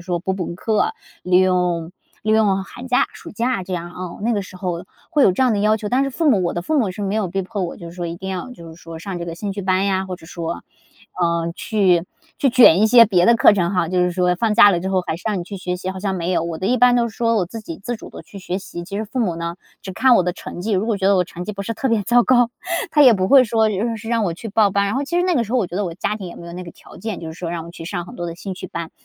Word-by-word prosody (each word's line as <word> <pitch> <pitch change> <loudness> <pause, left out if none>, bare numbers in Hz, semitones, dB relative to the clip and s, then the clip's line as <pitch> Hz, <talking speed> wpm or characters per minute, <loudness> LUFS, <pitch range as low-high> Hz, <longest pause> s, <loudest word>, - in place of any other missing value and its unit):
说 175 -1 -2
补 190 +2 -2
补 180 -2 -4
课， 225 - 0 0.3
利 180 0 +3
用 180 -3 +1 0.3
利 215 - +1
用 205 -3 +3
寒 250 +6 -10
假 250 - +3
暑 - - -11
假 230 -3 -1
这 185 +1 -7
样， 175 0 -5
嗯， 180 -1 -6
那 235 - +1
个 205 - 0
时 185 -1 -10
候 180 -1 -4 0.3
会 295 -5 +3
有 195 - +6
这 185 - 0
样 255 - +3
的 210 - 0
要 210 +1 +3
求， 210 -1 -5
但 255 +2 +3
是 - - -1
父 315 +3 0
母 195 -6 +3
我 170 - 0
的 175 - -3
父 310 - 0
母 210 -7 +1
是 205 +3 -6
没 200 0 -1
有 215 -4 0
逼 195 +2 -2
迫 200 0 -4
我， 175 - -4
就 170 -1 -9
是 175 - -14
说 175 -1 -3
一 170 +1 -5
定 190 +2 -6
要 185 +6 -4
就 170 -10 -11
是 160 - -11
说 165 -1 -9
上 180 +1 -5
这 170 - -4
个 165 - -5
兴 200 +3 -4
趣 200 - -5
班 185 +1 +1
呀， 190 -1 0
或 185 -1 -5
者 160 - -17
说 170 0 -5 0.6
呃， 170 -1 0
去 185 -6 +2 0.3
去 275 - +3
卷 235 -8 +7
一 220 - +5
些 235 +1 +8
别 180 -5 +3
的 235 0 +6
课 - - +6
程 180 -3 +1
哈， 180 -3 +1
就 185 +1 0
是 180 0 +2
说 180 0 +1
放 220 +1 +1
假 205 - +8
了 175 -3 0
之 190 - -3
后 190 -1 +1
还 160 - -2
是 - - -15
让 210 -3 0
你 175 - -4
去 200 +2 -7
学 180 -1 -3
习， 185 +1 -4
好 190 - -7
像 195 -1 -1
没 180 0 -2
有， 170 - +1
我 170 -1 -4
的 185 - -3
一 250 +2 +2
般 245 0 +5
都 235 -1 +2
是 - - -17
说 230 -1 +1
我 190 - +2
自 225 +6 -8
己 165 -6 -7
自 240 - -3
主 220 - -10
地 - - -10
去 200 - -12
学。 185 -1 -3
其 185 0 -7
实 215 - -2
父 255 +5 -6
母 180 -8 0
呢， 170 +1 -4 0.3
只 190 - -6
看 255 +5 +4
我 - - +4
的 180 - -1
成 175 - -8
绩， 215 +1 -2
如 195 +3 +1
果 225 - 0
觉 195 -1 0
得 200 -1 +5
我 180 - +2
成 175 0 -8
绩 210 - -4
不 200 -1 -5
是 230 +3 -4
特 265 +5 -1
别 220 -2 +2
糟 240 +2 +4
糕， 245 -2 +4 0.4
他 295 - +5
也 255 -4 +8
不 185 -2 0
会 270 -2 +7
说 220 -1 +2
就 225 +3 -1
是 225 - -9
让 230 -2 +1
我 175 - -1
去 220 +7 -8
报 205 0 +3
班， 200 +1 +1
然 200 - -1
后 275 +2 -1
其 335 - -6
实 360 - +1
那 360 - +2
个 240 - +2
时 220 - -7
候 255 - +3
我 205 - 0
觉 175 - -7
得 205 - 0
我 170 - -4
家 210 +4 -2
庭 195 - -7
也 175 - -9
没 170 - -10
有 170 - -8
那 180 - -6
个 170 - -9
条 - - -16
件， 215 -1 -5
就 165 - -7
是 - - -9
说 170 -2 -4
让 170 -1 -4
我 - - -9
去 165 -1 -10
上 175 0 -4
很 - - -11
多 175 - -4
的 170 - -5
兴 190 +2 -6
趣 185 - -8
班， 170 -1 -6
190 Hz, 360 characters per minute, -20 LUFS, 175-220 Hz, 0.6 s, 些